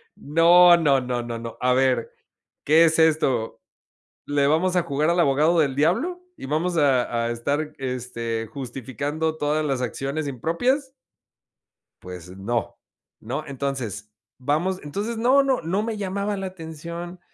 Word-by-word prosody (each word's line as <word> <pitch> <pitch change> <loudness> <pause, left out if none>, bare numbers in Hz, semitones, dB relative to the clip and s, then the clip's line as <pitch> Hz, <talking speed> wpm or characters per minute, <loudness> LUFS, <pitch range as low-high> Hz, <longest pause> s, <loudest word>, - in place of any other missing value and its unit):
No, 175 +3 +6
no, 140 -5 +3
no, 125 -1 -2
no, 120 -1 -5
no, 115 0 -8
a 125 0 +3
ver, 130 -3 +1 0.5
¿qué 160 +3 +6
es 160 0 +2
esto? 150 -8 +2 0.7
¿Le 145 -1 +1
vamos 175 +5 +2
a 180 - +3
jugar 150 0 0
al 175 +1 +2
abogado 155 +3 +3
del 140 -4 +1
diablo 235 - +1
y - - -9
vamos 165 +5 -1
a 125 -5 +2
a 120 - -1
estar, 145 +6 -2
este, 120 -3 -4
justificando 140 +5 -4
todas 150 +1 0
las 135 -3 -1
acciones 140 +4 -3
impropias? 245 - -1 1.1
Pues 90 -1 -9
no, 115 +3 -3 0.4
no. - - -4
Entonces, 125 -7 -4 0.3
vamos, 155 +8 -1
entonces 205 +10 -4
no, 260 +4 +4
no 265 -6 +1
no 185 +6 -1
me 225 -1 -3
llamaba 200 +1 -2
la 195 - -3
atención, 170 0 -8
150 Hz, 145 wpm, -23 LUFS, 125-175 Hz, 1.1 s, No